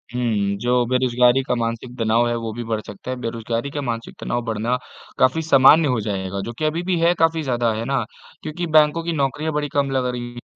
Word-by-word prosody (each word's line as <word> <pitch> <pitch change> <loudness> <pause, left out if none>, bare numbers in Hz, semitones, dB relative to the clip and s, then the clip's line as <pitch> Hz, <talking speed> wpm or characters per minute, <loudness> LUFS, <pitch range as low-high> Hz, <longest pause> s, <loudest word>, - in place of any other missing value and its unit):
हुँ, 125 - -1
हुँ। 100 -3 0
जो 125 +1 +2
बेरोज़गारी 125 0 +3
का 125 - -1
मानसिक 115 +1 -4
तनाव 115 +2 +2
है 120 - 0
वो 115 -1 -4
भी 120 - -5
बढ़ 110 -1 -2
सकता 105 +5 -7
है। 130 - -3
बेरोज़गारी 115 +2 -3
का 145 - -3
मानसिक 115 -3 -4
तनाव 120 - -2
बढ़ना 115 +3 -1 0.4
काफ़ी 130 +5 +3
सामान्य 155 +1 +6
हो 125 -4 +1
जाएगा 100 -2 -3
जो 115 - -5
कि 155 - 0
अभी 165 +3 -1
भी 180 -1 0
है 170 +1 +4
काफ़ी 165 0 +2
ज़्यादा 120 -3 0
है 110 +2 -3
ना? 135 -3 0 0.4
क्योंकि 170 +3 -4
बैंकों 155 +1 +4
की 170 - -2
नौकरियाँ 145 +2 -1
बड़ी 150 0 -1
कम 140 -1 +1
लग 130 -1 0
रही 125 -1 -2
हैं। 120 - -10
125 Hz, 225 wpm, -21 LUFS, 115-145 Hz, 0.4 s, सामान्य